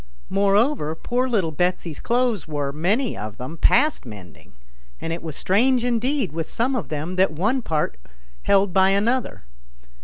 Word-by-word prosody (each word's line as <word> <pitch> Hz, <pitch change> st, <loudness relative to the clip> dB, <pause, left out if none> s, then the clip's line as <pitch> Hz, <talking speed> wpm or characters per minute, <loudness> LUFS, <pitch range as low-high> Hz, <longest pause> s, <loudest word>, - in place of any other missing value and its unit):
Moreover, 200 Hz, -, +2 dB
poor 250 Hz, +9 st, -1 dB
little 195 Hz, -9 st, +1 dB
Betsy's 175 Hz, -1 st, -1 dB
clothes 240 Hz, -, 0 dB
were, 145 Hz, -2 st, -2 dB
many 205 Hz, -, 0 dB
of 105 Hz, +1 st, -7 dB
them, 130 Hz, +6 st, -6 dB
past 300 Hz, -, +3 dB
mending, 100 Hz, -, -12 dB, 0.5 s
and 165 Hz, -, -3 dB
it 170 Hz, -, -5 dB
was 160 Hz, -3 st, -6 dB
strange 245 Hz, +6 st, +2 dB
indeed 245 Hz, -, 0 dB
with 165 Hz, +1 st, -4 dB
some 255 Hz, +4 st, 0 dB
of 235 Hz, -, -3 dB
them 155 Hz, +5 st, -4 dB
that 190 Hz, -1 st, +4 dB
one 215 Hz, -, 0 dB
part 155 Hz, -, -1 dB, 0.5 s
held 195 Hz, -2 st, +3 dB
by 190 Hz, 0 st, +5 dB
another. 225 Hz, +6 st, 0 dB
190 Hz, 155 wpm, -23 LUFS, 160-240 Hz, 0.5 s, by